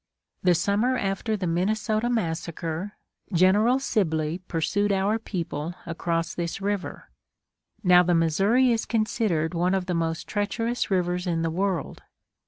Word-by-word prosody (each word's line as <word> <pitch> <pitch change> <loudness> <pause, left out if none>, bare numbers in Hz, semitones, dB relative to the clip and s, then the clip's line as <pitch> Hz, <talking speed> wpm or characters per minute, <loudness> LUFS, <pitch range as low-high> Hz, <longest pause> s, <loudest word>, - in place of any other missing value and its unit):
The 180 -1 +4
summer 205 +8 +1
after 205 +1 -1
the 190 - -3
"Minnesota 215 +6 0
massacre," 170 -2 -3 0.4
General 205 +8 +4
Sibley 165 - 0
pursued 205 +5 0
our 200 +3 +1
people 170 -5 -4
across 165 0 -2
this 170 +1 -3
river. 200 -1 -4 0.7
Now 180 -1 +7
the 175 -1 +2
Missouri 195 +10 +3
is 225 -1 0
considered 215 -7 0
one 180 +2 +1
of 190 -1 -1
the 180 - -2
most 165 -1 -2
treacherous 230 +4 -1
rivers 180 -1 0
in 165 -1 0
the 165 - 0
world. 185 -2 -2
185 Hz, 135 wpm, -25 LUFS, 165-210 Hz, 0.7 s, Now